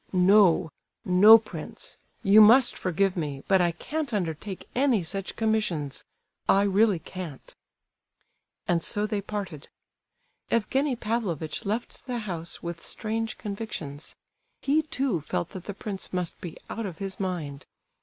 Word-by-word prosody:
"No—no, 185 +2 +5
prince; 225 - -8 0.2
you 210 +1 +7
must 240 +4 +7
forgive 185 +1 0
me, 145 -5 -4
but 190 -2 +4
I 175 -1 +3
can't 290 - -4
undertake 180 +1 -4
any 250 -7 +2
such 195 +4 -5
commissions! 210 - -1 0.4
I 195 - +5
really 205 0 +3
can't." 165 -4 -9 1.1
And 170 -1 +2
so 205 0 +2
they 210 -1 -2
parted. 195 -7 -6 0.8
Evgenie 265 +4 +1
Pavlovitch 210 -9 -3
left 220 +4 -3
the 250 -1 -2
house 175 -7 -5
with 170 -1 -5
strange 225 +1 -3
convictions. 200 -9 -6 0.5
He, 290 +3 +3
too, 270 - -1
felt 165 +3 -3
that 185 -3 -9
the 205 - -6
prince 200 -2 -5
must 180 -2 -3
be 170 -3 -7
out 225 -1 -4
of 175 -4 -8
his 195 0 -5
mind. 160 -7 -4
195 Hz, 135 wpm, -27 LUFS, 170-220 Hz, 1.1 s, you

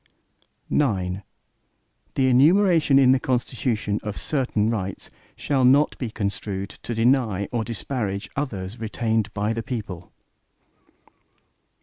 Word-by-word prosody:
IX 95 -10 +1 1.0
The 135 - +2
enumeration 155 +3 +5
in 130 -2 +6
the 130 - +4
Constitution, 120 -4 -1
of 105 -1 -5
certain 125 -7 0
rights, 95 -4 -4 0.2
shall 135 -3 0
not 140 +4 +5
be 125 - -3
construed 100 -2 -4
to 120 - -4
deny 115 -4 +2
or 115 -2 -1
disparage 110 -3 -3
others 105 -7 -4
retained 110 -1 -1
by 105 +2 0
the 115 - -3
people. 100 -9 -6
115 Hz, 110 wpm, -24 LUFS, 100-130 Hz, 1.0 s, in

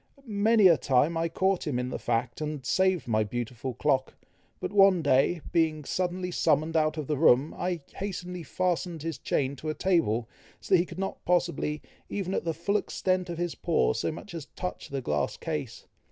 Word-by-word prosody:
Many 215 -1 +3
a 170 -3 +6
time 145 +5 +2
I 165 0 0
caught 190 +1 0
him 135 -5 0
in 125 0 -2
the - - -4
fact, 120 +3 -1
and 150 -3 -4
saved 185 +1 +2
my 110 -2 +2
beautiful 120 +3 -4
clock; 135 -1 0 0.4
but - - -4
one 195 -4 +6
day, 145 +4 +3
being 155 -3 +1
suddenly 180 +2 -2
summoned 160 -1 +1
out 155 0 +2
of 155 - -3
the 150 0 -1
room, 140 -1 +4
I 175 -2 -2
hastily 180 -2 -5
fastened 175 0 -2
his 165 -1 -4
chain 140 0 -1
to 155 - -5
a 155 - -2
table, 140 - +1 0.3
so - - -3
that 185 - +7
he 175 - 0
could - - -10
not 195 0 -4
possibly, 170 -4 0 0.3
even 195 -2 -3
at - - -1
the 165 - 0
full 200 +6 +1
extent 185 -2 -1
of 170 - -4
his 175 -1 -2
paw, 170 - +1
so - - -1
much 170 +4 -9
as 165 -4 -6
touch 180 - -5
the 140 -1 -3
glass 75 - -1
case. - - -5
165 Hz, 195 wpm, -28 LUFS, 140-180 Hz, 0.4 s, that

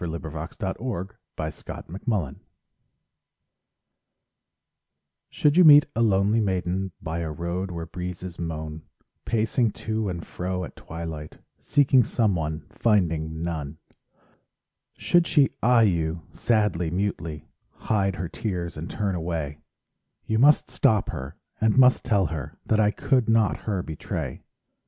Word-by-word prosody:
SONGS 85 -2 -3 0.5
AND 95 -4 -2
DREAMS 105 -5 -4 0.2
I 80 0 -2
Did - - -19
Not - - -7 0.3
Betray 70 -7 -4 2.9
Should 150 0 +2
you 180 - +8
meet 150 -2 +9
a 115 - +1
lonely 105 +1 +3
maiden 95 -1 -1
By 80 +1 -4
a 80 -2 -3
road, 85 +4 -3
where 85 -2 -5
breezes 90 +1 -6
moan, 80 -2 -5 0.4
Pacing 115 +1 +1
to 110 -2 -2
and 85 -2 -5
fro 90 0 -3
at - - -8
twilight; 80 -2 -7 0.2
Seeking 135 -3 +4
someone, 80 -10 -1
finding 80 -7 +1
none; 80 -3 -4 1.2
Should 175 -1 +3
she 145 -4 +4
eye 120 0 +5
you 85 -4 0
sadly, 105 -7 +1
mutely, 85 -4 -3 0.3
Hide 95 -3 0
her 90 0 -3
tears 90 -3 -4
and 80 +3 -5
turn 100 -2 -1
away— 80 -4 -3 0.7
You 110 0 0
must 145 +4 +5
stop 110 -2 +2
her 65 +5 -6 0.3
and 110 +2 +3
must 130 -1 +6
tell 100 -6 +2
her 80 -5 -5
That 110 - +2
I 105 -1 +4
could 125 +2 +1
not 110 -7 +3
her 95 -4 0
betray. 80 -1 -5
95 Hz, 135 wpm, -25 LUFS, 80-110 Hz, 2.9 s, meet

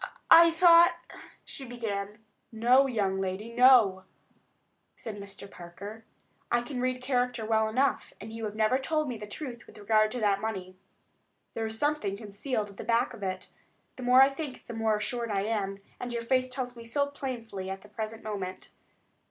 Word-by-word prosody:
"I 335 0 +10
thought——" 340 0 +6 0.5
she 275 - -7
began. 215 -3 -5 0.3
"No, 245 +4 +4
young 195 -6 0
lady; 195 +5 -4
no," 235 -7 +5 0.9
said 220 -3 -7
Mr. 200 0 -9
Parker. 200 +5 -10 0.5
"I 240 - +3
can 250 0 -5
read 255 0 -1
character 250 -3 0
well 220 0 +2
enough, 260 +5 0
and 215 +3 -9
you 225 0 -5
have 210 0 -5
never 220 +4 +2
told 310 +2 -1
me 245 -3 -4
the 210 - -7
truth 240 +1 -7
with - - -15
regard 215 +1 +3
to 250 - -3
that 200 -2 +1
money. 190 -4 -4 0.8
There 225 -1 -2
is 220 0 -5
something 255 -9 0
concealed 210 +1 -4
at 200 - -18
the - - -6
back 230 +1 +1
of 230 - -11
it. 185 -1 -4 0.5
The - - -10
more 250 +1 +7
I 270 - +5
think 275 -1 -7
the 235 - -7
more 220 -1 +1
assured 235 +2 -3
I 195 -2 0
am, 200 -2 -2 0.2
and 245 - -5
your 235 -1 -3
face 255 +2 +1
tells 250 -1 -5
me 235 - -10
so 260 +5 0
plainly 235 -9 -6
at 190 0 -5
the 210 - -15
present 220 +1 -6
moment. 195 -4 -5
225 Hz, 185 wpm, -29 LUFS, 205-255 Hz, 0.9 s, I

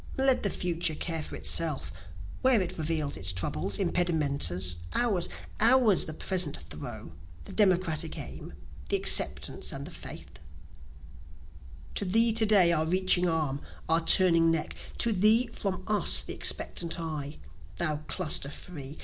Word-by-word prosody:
(Let 265 -1 +2
the 200 - -1
future 175 -3 -2
care 165 0 -3
for - - -8
itself, 150 - -1 0.5
where 260 -3 +3
it 185 -3 -4
reveals 155 -2 -3
its 90 -1 +4
troubles, 90 0 -2
impedimentas, 140 - 0 0.2
Ours, 205 -8 0 0.3
ours 230 -4 +5
the 155 - -6
present 180 - -1
throe, 75 +1 -9 0.3
the - - -11
democratic 185 -6 0
aim, - - -9 0.4
the - - +5
acceptance - - +3
and - - -7
the - - -10
faith;) - - -10 1.5
To - - 0
thee 225 +4 +3
to 220 0 +5
day 195 -5 +4
our 160 -1 0
reaching 180 0 +2
arm, 150 -4 -2 0.3
our 165 +1 +2
turning 165 -2 +4
neck 165 -1 -3 0.2
to 235 - +3
thee 215 +5 +5
from 195 -4 -5
us 210 -1 +2
the - - -6
expectant 170 -1 0
eye, 155 -3 -6 0.4
Thou 155 -3 0
cluster 150 -2 -1
free! 145 -2 -10
170 Hz, 140 wpm, -27 LUFS, 150-190 Hz, 1.5 s, ours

